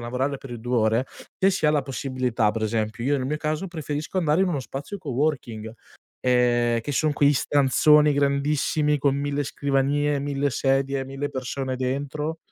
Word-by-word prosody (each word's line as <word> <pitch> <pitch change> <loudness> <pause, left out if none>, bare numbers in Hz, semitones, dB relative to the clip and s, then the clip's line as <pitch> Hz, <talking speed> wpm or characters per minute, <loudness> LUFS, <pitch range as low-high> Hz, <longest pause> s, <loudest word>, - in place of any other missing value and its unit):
a - - -8
lavorare 130 +4 -2
per 135 - -11
i 120 - -6
2 125 +1 -1
ore, 110 +2 +2 0.4
se 195 - +5
si 185 -5 0
ha - - +5
la 150 -2 +1
possibilità 130 -4 -1
per 110 +1 -4
esempio, 110 +1 -2
io 145 +2 +2
nel 130 -2 -2
mio 150 +3 -1
caso 155 +4 -2
preferisco 155 +1 -4
andare 160 -1 +2
in 190 - +2
uno 145 -6 -1
spazio 140 +10 -7
coworking, 130 -7 -2 0.5
ehm, 120 -2 +2
che 145 +6 -4
son 150 +2 +1
quei 145 0 +4
stanzoni 145 +2 +4
grandissimi 145 +1 +1
con 140 0 +1
1000 145 0 -1
scrivanie, 140 +1 0
1000 140 0 -1
sedie, 135 +1 0
1000 135 +2 -4
persone 130 0 -3
dentro. 145 +5 -3
140 Hz, 175 wpm, -24 LUFS, 125-150 Hz, 0.5 s, se